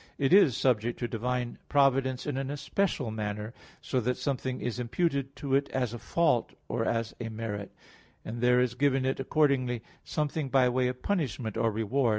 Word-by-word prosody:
10), 140 - 0
it 135 - +3
is 175 - +6
subject 120 -2 +1
to 120 - -2
divine 125 +1 -2
providence 135 -2 +3
in 145 - -2
an 135 0 -2
especial 145 - -1
manner, 105 +1 -4 0.3
so 130 - 0
that 125 +1 0
something 130 -2 -2
is 120 0 -3
imputed 140 +2 -1
to 140 -2 -3
it 140 +1 +2
as 125 -3 -1
a 120 - -6
fault, 160 -7 +1
or - - -1
as 115 -1 -1
a 115 - -3
merit; 110 -3 -5 0.5
and 115 +2 -5
there 125 0 +5
is 125 -1 +2
given 135 0 +2
it 135 +1 0
accordingly 135 -4 +1 0.2
something 150 -1 -2
by 130 -1 +4
way 125 +1 +2
of 125 0 -5
punishment 130 - -1
or 115 - +2
reward. 115 +4 +1
125 Hz, 185 wpm, -29 LUFS, 115-140 Hz, 0.5 s, is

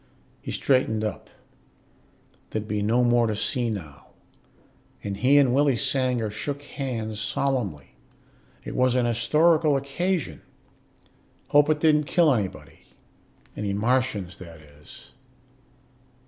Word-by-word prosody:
He - - -8
straightened 120 -5 +1
up 105 -3 -5 1.2
there'd 110 -1 -4
be 105 -1 -2
no 115 +4 +2
more 120 -1 +3
to 110 - -1
see 120 +3 -1
now 85 -10 -7 1.0
and 100 -1 -3
he 130 +6 +4
and 135 -4 +4
Willie 140 -1 +3
Sanger 125 -3 0
shook 140 +6 -5
hands 115 -7 -5
solemnly. 110 - -2 0.7
It - - -7
was 130 -1 +2
an 125 -1 +2
historical 150 +6 +3
occasion. 140 - -2 1.1
"Hope 145 +1 +4
it 155 -1 +2
didn't 150 -1 +3
kill 155 +1 +3
anybody. 100 -6 -4 0.8
Any 100 -1 -3
Martians, 105 -4 -1
that 85 -3 -12
is. 75 -1 -16
120 Hz, 120 wpm, -25 LUFS, 105-140 Hz, 1.2 s, he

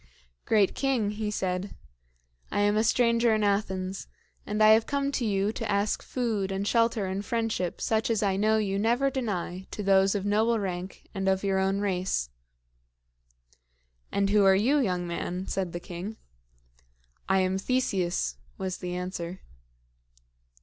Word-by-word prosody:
"Great 205 -3 +3
king," 255 -7 0
he 210 0 -3
said, 190 -1 -2 0.8
"I - - +1
am 205 0 +3
a 215 - +3
stranger 235 0 +3
in 215 - 0
Athens, 195 -2 -1 0.4
and 210 +1 +1
I 215 - +8
have 220 +1 +5
come 280 -1 0
to 270 - -1
you 200 -1 +1
to 225 -1 -4
ask 200 +1 +1
food 220 -6 -2
and 195 +1 -2
shelter 230 -3 +2
and 190 +2 -3
friendship 225 -6 -2
such 220 +1 0
as 220 -2 +1
I 195 -2 +2
know 215 +2 +3
you 200 -2 0
never 240 +6 +2
deny 190 -7 -3
to 210 - -5
those 195 0 +4
of 200 -1 -2
noble 220 +3 +2
rank 185 -2 -5
and 195 -2 0
of 190 0 +1
your 195 -1 +1
own 195 +1 +1
race." 180 - -1 1.8
"And 200 0 +1
who 210 -1 +5
are 195 0 +6
you, 255 +10 +3
young 180 -8 0
man?" 175 +2 -4
said 190 -3 -2
the 175 - -4
king. 180 +5 -7 1.1
"I 190 - +4
am 185 +1 0
Theseus," 195 -7 0 0.2
was 190 -1 -3
the 180 -1 -4
answer. 180 0 -5
200 Hz, 160 wpm, -28 LUFS, 190-220 Hz, 1.8 s, I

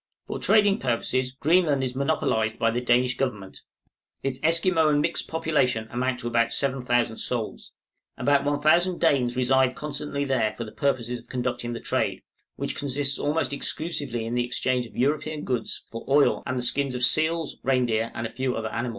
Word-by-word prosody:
For - - -5
trading 205 -2 +4
purposes 125 +1 -1
Greenland 150 0 +2
is 125 -1 -2
monopolized 110 -6 0
by 115 - +2
the 120 +2 -1
Danish 125 +1 +2
government; 105 -8 -4 0.6
its 135 -1 -2
Esquimaux 165 0 +3
and 145 -1 +3
mixed - - 0
population 150 -9 0
amount 125 +1 -1
to 120 - -4
about 115 0 +1
7000 125 -4 0
souls. 115 -3 -4 0.5
About 140 -1 +2
1000 155 +5 +2
Danes 130 -7 +2
reside 130 0 +2
constantly 145 -1 -3
there 130 -6 0
for 115 - -5
the 110 - -9
purpose 130 -4 -1
of 120 -1 -6
conducting 120 -1 -3
the 115 - -5
trade, - - -1 0.3
which - - -3
consists 140 0 -1
almost 150 0 0
exclusively 140 -6 -2
in 115 - -4
the 120 0 +1
exchange 125 0 -1
of - - -16
European 150 +3 0
goods 125 -3 -3
for 115 - -6
oil 145 +1 +4
and 130 -1 -2
the 125 - -1
skins 135 +1 0
of 125 - -2
seals, 155 +4 +2
reindeer, 120 -4 +1
and 115 - -3
a 115 - -5
few 130 0 -2
other 110 0 -3
animals. 120 +3 -3
130 Hz, 175 wpm, -25 LUFS, 120-145 Hz, 0.6 s, trading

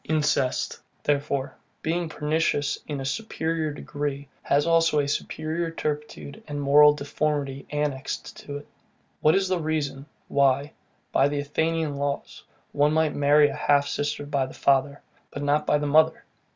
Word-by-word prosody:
Incest, 150 -4 0 0.2
therefore, 140 -2 -1 0.3
being 165 +1 -1
PERNICIOUS 150 -1 0
in 145 -2 -3
a 135 - -4
superior 160 -2 -2
degree, 145 -1 -4
has 145 +1 +2
also 165 -2 +3
a 145 -1 +2
superior 160 +3 -2
turpitude 150 -3 -5
and 145 -1 -4
moral 145 +1 +7
deformity 145 -1 -2
annexed 145 -2 -3
to 145 0 -7
it. 145 - -12 0.5
What 155 +3 +4
is 195 0 +2
the 185 -1 0
reason, 150 -3 -2 0.2
why, 140 +1 +2 0.4
by 135 - +4
the 145 0 -2
Athenian 160 +1 -1
laws, 140 0 -3 0.3
one 145 +1 +2
might 160 -1 +2
marry 145 +1 +5
a - - -5
half 145 0 +2
sister 145 0 -2
by 140 -2 0
the - - -12
father, 140 +1 +1 0.3
but 145 - -6
not 145 +1 +1
by 150 - +4
the 150 - -2
mother? 155 +2 +3
145 Hz, 150 wpm, -25 LUFS, 140-155 Hz, 0.5 s, moral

